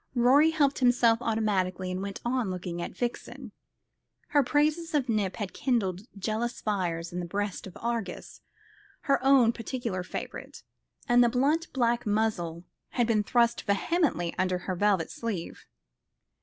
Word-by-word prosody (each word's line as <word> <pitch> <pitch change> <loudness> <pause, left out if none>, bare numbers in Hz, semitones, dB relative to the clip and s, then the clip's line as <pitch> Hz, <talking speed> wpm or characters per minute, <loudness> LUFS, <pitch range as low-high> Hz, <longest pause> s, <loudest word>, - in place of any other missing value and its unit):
Rorie 260 +6 +5
helped 290 -4 +1
himself 245 -3 +4
automatically, 190 -5 0
and 185 +1 -3
went 200 0 -5
on 240 -3 0
looking 180 -1 -4
at - - -6
Vixen. 240 -1 -4 0.8
Her 290 - +4
praises 305 +4 +1
of 275 -4 +1
Nip 210 -5 0
had 205 -4 -5
kindled 210 -6 -1
jealous 220 +4 -2
fires 175 -5 -2
in 180 - -3
the 175 - -3
breast 200 +1 -3
of 185 - -11
Argus, 230 -6 -4 0.6
her 275 -3 +1
own 265 -4 +6
particular 230 -5 -4
favourite; 180 - -7 0.4
and 245 0 +5
the 240 - +4
blunt 285 +7 +1
black 240 -2 0
muzzle 200 -6 -1 0.3
had 240 - +2
been 225 -2 +2
thrust 235 +2 +2
vehemently 200 - +1
under 185 -1 +1
her 185 - -1
velvet 195 -3 +1
sleeve. 210 -8 -5
225 Hz, 145 wpm, -28 LUFS, 185-250 Hz, 0.8 s, own